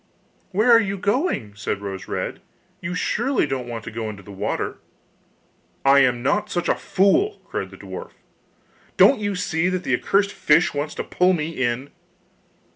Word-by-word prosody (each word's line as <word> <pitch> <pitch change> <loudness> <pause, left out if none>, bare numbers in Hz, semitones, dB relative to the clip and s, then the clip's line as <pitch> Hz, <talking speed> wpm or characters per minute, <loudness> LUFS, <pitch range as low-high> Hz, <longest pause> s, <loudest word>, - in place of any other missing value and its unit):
'Where 215 +6 +3
are 230 - +8
you 200 -2 -2
going?' 205 - 0
said 100 0 -3
Rose 95 -1 -6
red; - - -4 0.4
'you 185 -1 -4
surely 240 - +1
don't 135 -3 -3
want 115 -2 -5
to - - -7
go 110 0 -4
into 100 -2 -9
the 100 - -11
water?' 95 - -3 1.1
'I 140 +1 +7
am 125 -3 +2
not 205 +9 +1
such 175 -3 -1
a - - +4
fool!' 340 - +2
cried - - -4
the - - -13
dwarf; - - -8 0.8
'don't 275 - +6
you 205 -1 -1
see 175 -1 0
that 185 -1 -2
the - - -1
accursed 200 0 +2
fish 160 +3 +3
wants 145 +1 -3
to - - -3
pull 180 +1 +2
me 155 -2 -1
in? 130 -2 -2
165 Hz, 175 wpm, -23 LUFS, 120-200 Hz, 1.1 s, are